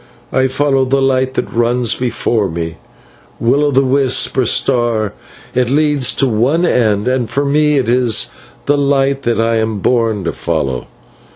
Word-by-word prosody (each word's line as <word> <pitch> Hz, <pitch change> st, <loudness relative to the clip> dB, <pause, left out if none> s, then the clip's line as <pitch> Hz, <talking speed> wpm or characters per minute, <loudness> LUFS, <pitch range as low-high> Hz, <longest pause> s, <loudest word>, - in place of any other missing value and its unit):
I 130 Hz, 0 st, +2 dB
follow 135 Hz, 0 st, +1 dB
the 135 Hz, +1 st, +1 dB
light 130 Hz, -1 st, 0 dB
that -, -, -3 dB
runs 120 Hz, 0 st, +1 dB
before 115 Hz, -4 st, -1 dB
me; 80 Hz, 0 st, -5 dB, 0.6 s
will 130 Hz, +5 st, +2 dB
o' 145 Hz, -, +2 dB
the 135 Hz, 0 st, +2 dB
wisp 130 Hz, 0 st, +1 dB
or 130 Hz, -3 st, +1 dB
star, 120 Hz, -6 st, +1 dB, 0.4 s
it 125 Hz, -1 st, 0 dB
leads 145 Hz, -2 st, +1 dB
to 135 Hz, -, +1 dB
one 130 Hz, +10 st, +1 dB
end, 110 Hz, -, +1 dB
and 125 Hz, -3 st, 0 dB
for 140 Hz, +5 st, -1 dB
me 150 Hz, +1 st, +2 dB
it 130 Hz, -4 st, 0 dB
is 120 Hz, -2 st, +1 dB, 0.3 s
the 145 Hz, 0 st, +1 dB
light 140 Hz, -1 st, +1 dB
that 120 Hz, -3 st, -1 dB
I 115 Hz, 0 st, +1 dB
am 110 Hz, -1 st, -1 dB
born 110 Hz, -1 st, 0 dB
to 85 Hz, -, -1 dB
follow. 75 Hz, -8 st, -3 dB
125 Hz, 170 wpm, -15 LUFS, 115-135 Hz, 0.6 s, I